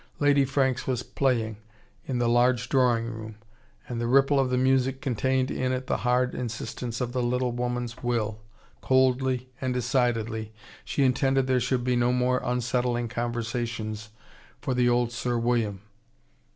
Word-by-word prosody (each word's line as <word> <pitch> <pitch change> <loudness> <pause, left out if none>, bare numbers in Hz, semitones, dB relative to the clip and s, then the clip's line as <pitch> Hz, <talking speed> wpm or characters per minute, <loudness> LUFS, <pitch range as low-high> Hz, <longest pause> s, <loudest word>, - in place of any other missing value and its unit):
Lady 145 -1 +4
Franks 135 -1 0
was 125 -2 -1
playing, 115 -6 0 0.5
in 130 - -1
the 120 -1 +1
large 120 +1 +2
drawing 125 -3 +3
room. 110 -1 -7 0.5
And 120 -1 -4
the 120 - -1
ripple 135 +2 +4
of 135 -1 +2
the 125 - +1
music 130 0 +2
contained 130 0 0
in 130 0 -1
it 130 0 -2
the - - 0
hard 125 0 +1
insistence 120 0 -4
of 120 -1 -2
the 125 0 -1
little 125 +1 0
woman's 120 0 -3
will. 110 -3 -1 0.4
Coldly, 130 -1 +2
and 130 -1 -1
decidedly, 115 -3 0 0.3
she 140 - 0
intended 135 +1 +2
there 130 -1 +2
should 125 0 0
be 125 0 +1
no 120 0 +2
more 125 0 +1
unsettling 120 -1 0
conversations 115 -2 -3 0.5
for 130 - -2
the 125 -1 +3
old 120 -1 +2
Sir 120 +1 -1
William. 115 -4 0
125 Hz, 155 wpm, -27 LUFS, 120-130 Hz, 0.5 s, Lady